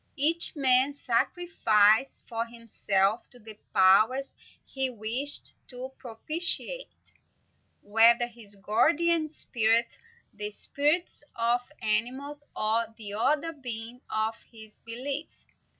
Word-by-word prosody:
Each 325 +5 +3
man 265 0 +3
sacrificed 230 - +1
for 230 -1 -3
himself 220 -3 -1
to 250 - -16
the 220 -2 -12 0.2
powers 215 +9 +3 0.3
he 265 -1 -2
wished 250 +5 0
to 255 +1 -8
propitiate, 330 - +1 0.7
whether 230 +3 +5
his 230 -4 -12
guardian 310 - +1
spirit, 230 -5 0 0.4
the 210 0 -4
spirits 295 +10 -2
of 240 +3 -1
animals, 260 +7 -2
or 225 +2 0
the 205 -3 -7
other 285 +9 0
beings 245 -3 -8
of 220 +1 -1 0.2
his 220 -2 -15
belief. 270 +6 -7
240 Hz, 105 wpm, -27 LUFS, 220-285 Hz, 0.7 s, whether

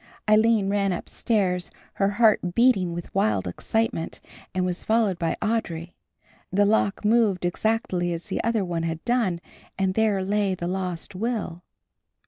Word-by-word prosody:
Aline 215 -1 +4
ran 200 -1 +1
upstairs, 180 0 -1 0.3
her 195 - +4
heart 215 -6 +3
beating 230 -8 +4
with 175 0 -7
wild 105 - +1
excitement, 220 - -2 0.3
and 185 0 -1
was 180 -1 -2
followed 220 -5 +1
by 165 - -1
Audry. 180 -7 -2 0.6
The 200 +2 +3
lock 210 0 +1
moved 210 -5 +3
exactly 180 -2 0
as 170 0 -4
the 200 - -2
other 225 -4 +1
one 170 -2 -2
had 165 0 -4
done 230 -8 +1 0.4
and 190 -1 +1
there 210 -2 +2
lay 200 -1 +1
the 170 - -5
lost 180 -1 -3
will. 200 -4 -3
195 Hz, 145 wpm, -25 LUFS, 175-220 Hz, 0.6 s, Aline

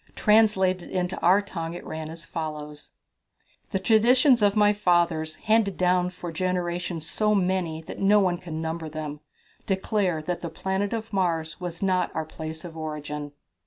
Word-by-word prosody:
Translated 200 -4 +3
into 180 0 -1
our 190 +4 +4
tongue 170 -4 -5
it 175 - -8
ran 160 0 -5
as 165 0 -9
follows: 150 -2 -6 0.8
"The 195 - 0
traditions 240 +5 +4
of 205 0 +4
my 210 -1 +5
fathers, 170 -5 +1
handed 215 0 +1
down 180 0 +2
for 175 -1 -7
generations 175 -1 -2
so 210 -1 +1
many 180 -4 0
that - - -8
no 205 +2 +5
one 180 -3 +1
can 165 -4 -6
number 160 0 -3
them, 150 -1 -5 0.5
declare 190 -3 0
that 175 +2 -3
the 170 - -4
planet 190 +4 -2
of 225 -1 -4
Mars 165 -4 0
was 175 +1 -4
not 185 -2 +1
the 160 - 0
place 160 +1 -7
of 165 -2 -9
our 160 - -6
origin." 150 -1 -5
180 Hz, 165 wpm, -26 LUFS, 160-195 Hz, 0.8 s, my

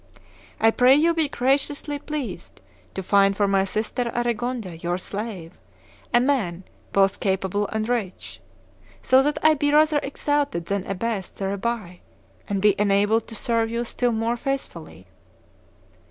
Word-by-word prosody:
I 225 0 +5
pray 250 +3 +5
you 330 +3 +3
be 320 -3 0
graciously 285 +3 0
pleased 300 -3 -6 0.4
to 190 - -4
find 195 +1 +3
for 205 - +2
my 195 -1 +2
sister 225 +4 -2
Aregonde, 240 -7 -2
your 175 +1 -1
slave, 195 -3 -7 0.5
a 240 - +5
man 230 -10 0 0.3
both 195 -1 +2
capable 195 +1 -1
and 220 0 -3
rich, 230 -7 -4 0.6
so 260 +1 +5
that 295 +2 0
I 315 0 +6
be 290 -1 0
rather 305 0 +4
exalted 285 - -1
than 200 +1 -2
abased 195 0 -3
thereby, 195 -1 -3 0.5
and 200 -1 -1
be 210 -1 +6
enabled 205 +2 +2
to 225 - -9
serve 230 +1 0
you 235 +1 -2
still 245 +1 0
more 230 +1 -1
faithfully. 275 +2 -5
225 Hz, 140 wpm, -23 LUFS, 195-265 Hz, 0.6 s, I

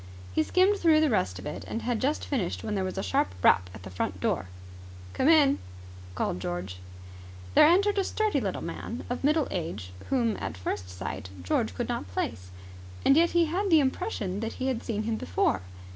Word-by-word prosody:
He - - +3
skimmed 375 - +3
through 320 -3 +5
the 310 -3 +3
rest 90 - 0
of 90 - -9
it, - - -5
and 225 - -4
had 240 -3 -1
just 285 +4 0
finished 235 -12 -2
when 215 - -3
there 195 -2 0
was 185 - -4
a - - -1
sharp 95 -1 0
rap 90 -1 +5
at 95 0 -11
the 95 - -9
front 90 - -3
door. 95 - -1 0.7
"Come 260 - +1
in!" 300 -4 +5 0.6
called 90 - -1
George. 90 +1 -4 0.8
There - - +8
entered 400 +4 +4
a - - +2
sturdy 420 -7 0
little 195 -4 -3
man 225 +7 -5
of 245 - -3
middle 300 +1 +3
age 160 - -4 0.2
whom 235 -5 +1
at 80 - -5
first 90 0 -4
sight 90 0 -6
George 90 - 0
could - - -2
not 95 - -3
place. 90 0 -3 0.6
And 275 - +6
yet 335 +2 +4
he 340 - +5
had 375 +6 -1
the 325 -3 +7
impression 260 - -1
that 225 +1 -3
he 260 +1 -2
had 250 -3 -2
seen 215 -2 -2
him 220 0 -1
before. 90 - 0
225 Hz, 205 wpm, -28 LUFS, -, 0.8 s, There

